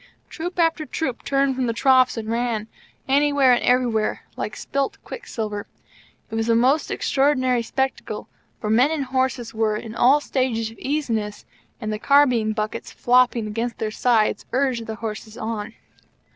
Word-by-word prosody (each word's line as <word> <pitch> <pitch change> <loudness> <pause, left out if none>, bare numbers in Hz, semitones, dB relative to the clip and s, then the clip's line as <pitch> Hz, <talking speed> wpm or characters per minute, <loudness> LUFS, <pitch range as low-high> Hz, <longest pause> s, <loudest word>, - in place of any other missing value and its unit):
Troop 350 +2 -5
after 330 -2 +2
troop 280 -5 -3
turned 275 -1 +1
from 255 -1 -1
the 230 - 0
troughs 255 +1 +4
and 220 -1 -4
ran 230 -2 -1 0.4
anywhere, 280 -1 +4
and 245 - +2
everywhere 240 -4 +1
like 210 - -4
spit 275 0 -2
quicksilver. 215 - -5 0.6
It - - -10
was 225 +1 -1
a 230 - +4
most 265 +6 +3
extraordinary 255 -3 +1
spectacle, 265 +3 -3 0.3
for 210 - -2
men 250 +6 +5
and 310 -4 -1
horses 260 -2 -1
were 220 -1 +1
in 220 0 -7
all 260 +5 +5
stages 250 -6 -1
of 225 - -16
easiness, 230 -8 -2 0.3
and 215 -3 -3
the 210 - -4
carbine 250 -6 +4
buckets 215 +1 -4
flopping 245 -2 +3
against 230 +3 -3
their 215 -1 -2
sides 225 -1 +2
urged 255 -3 0
the 220 - -4
horses 220 -1 -6
on. 220 0 -4
245 Hz, 160 wpm, -23 LUFS, 220-270 Hz, 0.6 s, men